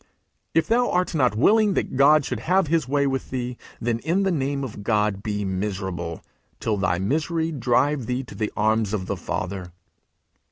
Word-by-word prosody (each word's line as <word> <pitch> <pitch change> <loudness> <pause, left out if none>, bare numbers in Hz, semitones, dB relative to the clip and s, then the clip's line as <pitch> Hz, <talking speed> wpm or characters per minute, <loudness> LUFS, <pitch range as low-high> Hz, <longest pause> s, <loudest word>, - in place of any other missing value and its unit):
If 165 - +4
thou 245 +2 +2
art 180 0 0
not 125 -8 +2
willing 205 - +4
that - - -1
God 140 +2 +5
should 125 - -3
have 185 +9 +2
his 160 -3 +1
way 140 +1 +2
with 135 -2 -2
thee, 125 -1 -3 0.2
then, 115 0 -1
in 170 +9 +1
the 190 - +2
name 140 -3 -1
of 110 -5 -6
God, 105 -2 +1
be 105 -1 -2
miserable 95 -3 -3 0.4
till 110 -2 0
thy 95 -2 +1
misery 160 - 0
drive 130 0 +1
thee 125 +1 -1
to 125 - -11
the 105 -1 -2
arms 110 0 +2
of 95 -3 -3
the - - -2
Father.' 90 -2 -4
125 Hz, 185 wpm, -24 LUFS, 105-155 Hz, 0.4 s, God